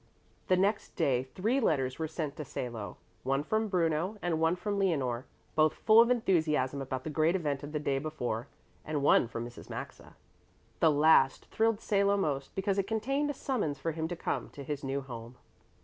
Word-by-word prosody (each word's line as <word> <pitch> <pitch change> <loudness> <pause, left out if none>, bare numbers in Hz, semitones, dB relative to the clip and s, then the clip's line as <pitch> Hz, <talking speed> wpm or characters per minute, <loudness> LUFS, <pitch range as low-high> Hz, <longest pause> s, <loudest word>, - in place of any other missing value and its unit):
The 185 - +4
next 200 +3 0
day 125 -3 +2
three 225 +8 +1
letters 135 - 0
were 160 - -1
sent 155 -2 -4
to 150 - -4
Salo, 120 -5 -5 0.2
one 135 +5 0
from 220 +7 0
Bruno 175 +1 0
and 175 -4 -1
one 165 +2 +3
from 200 +2 -2
Leonore, 135 -10 0 0.3
both 155 0 +3
full 220 +1 +6
of 235 - +4
enthusiasm 155 - +1
about 130 -1 -4
the 155 - -4
great 160 +3 +2
event 145 -6 -1
of 145 0 -7
the 150 - -1
day 140 -2 0
before; 135 -5 -3 0.4
and 150 -2 -2
one 135 - +5
from 115 0 -5
Mrs. 120 0 -11
Maxa. - - -8 0.6
The 160 - +5
last 145 -3 +4
thrilled 225 -1 +1
Salo 200 0 +2
most, 140 -8 -2
because 195 0 0
it 195 - 0
contained 275 +7 0
a - - -1
summons 220 - -1
for 165 +4 -2
him 160 0 -3
to 175 - -4
come - - -3
to 140 - -8
his 145 +1 -4
new 135 +1 -2
home. 120 -2 -9
155 Hz, 195 wpm, -31 LUFS, 135-195 Hz, 0.6 s, full